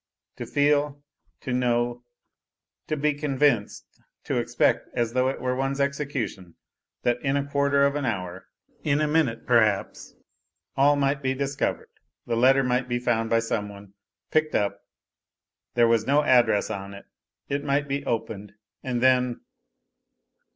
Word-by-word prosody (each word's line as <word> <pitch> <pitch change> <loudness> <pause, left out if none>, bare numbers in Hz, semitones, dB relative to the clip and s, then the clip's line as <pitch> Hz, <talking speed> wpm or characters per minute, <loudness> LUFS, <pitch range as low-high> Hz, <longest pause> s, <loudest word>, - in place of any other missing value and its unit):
To - - -6
feel, 145 0 +1 0.4
to 130 - -4
know, 120 -1 0 0.8
to 155 - -1
l)e 150 +1 +2
convinced, 140 -6 0 0.4
to - - -2
expect, - - +1
as 120 -1 -1
though 130 +1 +2
it 135 - -4
were 125 0 -1
one's 135 +1 -2
execution, 140 - -3 0.5
that 120 0 +1
in 135 0 0
a 140 - -1
quarter 140 0 +2
of 140 - +1
an 145 0 -2
hour, 95 -6 -4 0.4
in 145 -1 +1
a 155 - +1
minute 150 -7 0
perhaps, 110 -5 +1 0.6
all 140 +2 +4
might 140 0 0
be 130 -1 -1
di 140 - -1
i 140 0 -1
ov. - - -2
red, - - -19 0.4
the 120 - -1
letter 135 +3 +4
might 125 0 0
be 120 - 0
found 115 -2 0
by 115 - +3
some 110 -2 -2
one, 100 -1 -13 0.4
picked 155 0 +1
up; 100 -1 0 1.0
there 120 -1 +5
was 115 0 +2
no 145 +2 +3
address 120 -6 +3
on 100 -1 -6
it, 100 - -12 0.4
it 140 +1 -2
might 140 0 0
be 140 0 -2
opened, 110 -4 -4 0.3
and 125 -1 -2
then 125 -2 +3
130 Hz, 160 wpm, -25 LUFS, 115-140 Hz, 1.0 s, there